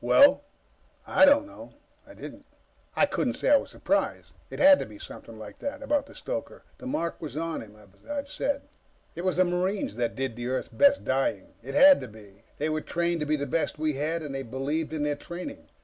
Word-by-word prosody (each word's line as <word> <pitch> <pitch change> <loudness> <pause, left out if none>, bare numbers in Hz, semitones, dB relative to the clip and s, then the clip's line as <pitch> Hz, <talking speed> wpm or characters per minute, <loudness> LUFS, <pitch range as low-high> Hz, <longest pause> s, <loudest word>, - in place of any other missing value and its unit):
"Well?" 285 0 +6 0.6
"I - - +5
don't 285 +1 +5
know." 300 0 -13 0.3
I - - -13
didn't. - - -10 0.5
I - - +5
couldn't - - -1
say - - +1
I 290 - +8
was - - -5
surprised. - - -1 0.2
It - - -7
had 285 0 +7
to - - -3
be 105 -1 -12
something 115 +2 -11
like 110 -1 -10
that, 285 0 -5
about 285 +1 0
the - - -15
stoker. - - -6 0.2
The - - -8
mark 170 - -2
was 150 -3 -6
on 165 0 -2
him, 105 -1 -13
as 100 - -20
I've 285 -1 -3
said. 285 0 -2 0.5
It 170 - -6
was 185 -3 +1
the 185 +2 +4
Marines 180 - -1
that 120 -1 -1
did 130 -3 -3
Earth's 130 +2 -2
best 280 0 +4
dying. 130 -7 -1
It 135 +4 -7
had 280 0 +8
to - - -6
be. 105 -3 -15 0.2
They 150 - -1
were 155 0 -1
trained 170 +1 -1
to 150 - -2
be 155 - +2
the 140 -1 -2
best 155 +3 -1
we 155 0 0
had, 155 +4 -2
and 145 -2 -6
they 135 - -3
believed 135 +6 -3
in 155 -2 -2
their 150 0 +1
training. 175 - -8
155 Hz, 220 wpm, -27 LUFS, -, 0.6 s, I